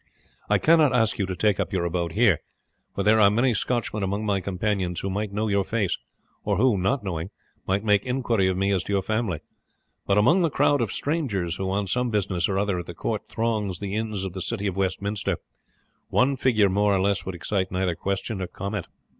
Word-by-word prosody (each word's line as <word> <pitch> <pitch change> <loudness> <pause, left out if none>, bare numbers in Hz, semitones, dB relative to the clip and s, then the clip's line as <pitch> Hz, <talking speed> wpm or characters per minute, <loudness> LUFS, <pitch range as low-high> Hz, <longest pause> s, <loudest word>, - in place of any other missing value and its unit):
I - - +4
cannot 155 -4 +4
ask 115 -2 +2
you 100 - 0
to 95 - -3
take 105 +2 +1
up - - -1
your 90 -3 0
abode 85 -1 -2
here, 105 -7 +4 0.6
for - - -1
there 110 +1 +5
are 100 -2 +7
many 120 +4 +2
Scotchmen 110 -1 -1
among 100 +2 -1
my 100 -2 +1
companions 95 -2 -1
who 95 - -3
might 105 +1 -2
know 105 +2 -1
your 100 -1 +2
face, 100 -3 0 0.5
or 100 -2 0
who, 125 +1 +4
not 100 +7 0
knowing, 85 -2 -3 0.4
might 95 +2 +1
make 105 -2 +3
inquiry 120 -6 +1
of 95 -1 0
me 100 +1 +1
as 95 -2 +2
to 100 - -3
your 100 -1 +1
family; 110 -7 -1 0.7
but 100 - +3
among 130 - +5
the 165 - +3
crowd 145 -1 +2
of 115 - -1
strangers 105 - -1
who 95 -1 -2
on 100 +1 0
some 125 +6 0
business 100 -5 0
or 95 - 0
other 100 -2 0
at 85 - -7
the 85 - -7
court 110 +5 -3
throng 110 -3 -1
the 100 -1 -4
inns 110 -2 -2
of 95 - -5
the 95 - -5
city 100 +3 -3
of 95 -3 -1
Westminster, 100 +1 -1 0.7
one 135 +2 +3
figure 115 -6 +3
more 100 +1 +2
or - - +1
less 100 +1 +1
would 95 - -5
excite 95 +1 -2
neither 90 -1 0
question 95 +4 -3
nor 95 - -3
comment." 100 +3 -5
100 Hz, 220 wpm, -25 LUFS, 95-110 Hz, 0.7 s, are